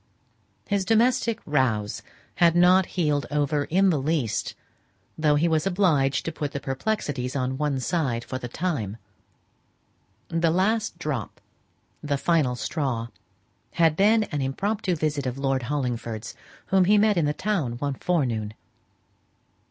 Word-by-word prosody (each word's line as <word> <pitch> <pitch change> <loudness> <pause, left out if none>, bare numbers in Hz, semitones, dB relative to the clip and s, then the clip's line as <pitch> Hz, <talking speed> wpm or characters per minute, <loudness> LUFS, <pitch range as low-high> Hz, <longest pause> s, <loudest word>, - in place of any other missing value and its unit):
His 200 -1 +1
domestic 230 +1 +2
"rows" 120 -8 0 0.4
had 170 -1 +4
not 180 +1 +5
healed 150 -4 +1
over 145 0 0
in 190 +3 +3
the 150 -5 0
least, 140 -7 -1 0.6
though 150 -1 +2
he 155 +4 +2
was 160 +1 +1
obliged 165 -8 +2
to 165 - -2
put 145 -3 -4
the 140 - -2
perplexities 135 - -3
on 130 -1 -1
one 145 -3 0
side 130 -5 -1
for 130 - -5
the 125 - -5
time. 120 - -3 1.3
The 165 0 +1
last 205 +4 +1
drop 150 - -4 0.6
the 145 -1 -1
final 150 -5 +1
straw, 125 -4 -2 0.6
had 165 -2 +3
been 215 +4 +4
an 150 -8 -4
impromptu 190 +8 -1
visit 150 -3 -1
of 125 +1 -3
Lord 135 -1 0
Hollingford's, 120 -6 -3 0.4
whom 190 -1 +4
he 205 - +4
had 210 - +5
met 210 -2 +3
in 165 - +2
the 145 - +1
town 170 - -1
one 140 +4 -2
forenoon. 120 -10 -1
150 Hz, 145 wpm, -25 LUFS, 130-180 Hz, 1.3 s, not